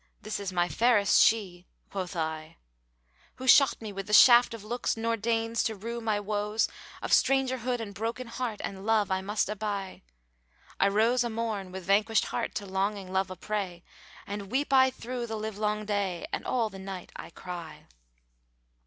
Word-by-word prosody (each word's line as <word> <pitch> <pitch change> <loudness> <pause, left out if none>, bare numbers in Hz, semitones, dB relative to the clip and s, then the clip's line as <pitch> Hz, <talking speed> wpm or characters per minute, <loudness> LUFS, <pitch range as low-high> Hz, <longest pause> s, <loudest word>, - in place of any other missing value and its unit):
'This 215 - -3
is 200 -2 -4
my 175 -1 +1
fairest 210 +4 +4
she;'(quoth 185 -2 -1
I) 160 0 -4 0.8
Who 260 - -8
shot 275 +1 +6
me 215 -2 -7
with 195 0 -6
the 210 - -4
shaft 240 +1 +8
of 220 - -10
looks 235 +2 -2
nor 230 +1 0
deigns 225 +1 0
to 220 - -1
rue 230 +4 -5
my 215 -2 0
woes 210 +1 0 0.2
* - - -17
Of - - -3
strangerhood 255 -2 +2
and 215 -3 -6
broken 230 +5 -3
heart 230 -2 -4
and 195 -1 -5
love 215 -2 +2
I 190 0 +1
must 205 +2 -1
aby: 205 -2 -4 0.8
I - - +5
rose 225 +5 +3
a 240 - -2
morn 220 -4 -3
with 190 -1 -7
vanquished 210 +4 +3
heart, - - -3
to 205 - -3
longing 195 0 -2
love 190 0 +1
a 185 - -6
prey 185 -3 -4 0.2
* - - -19
And 200 -1 -6
weep 275 +2 0
I 260 0 +6
through 245 -1 -5
the 220 -1 -4
live 215 -1 -5
long 210 0 -1
day 200 -4 -1
and - - -3
all 230 -4 0
the 195 - -9
night 190 -2 -7
I - - -8
cry." 170 -1 -8
210 Hz, 185 wpm, -28 LUFS, 195-230 Hz, 0.8 s, shaft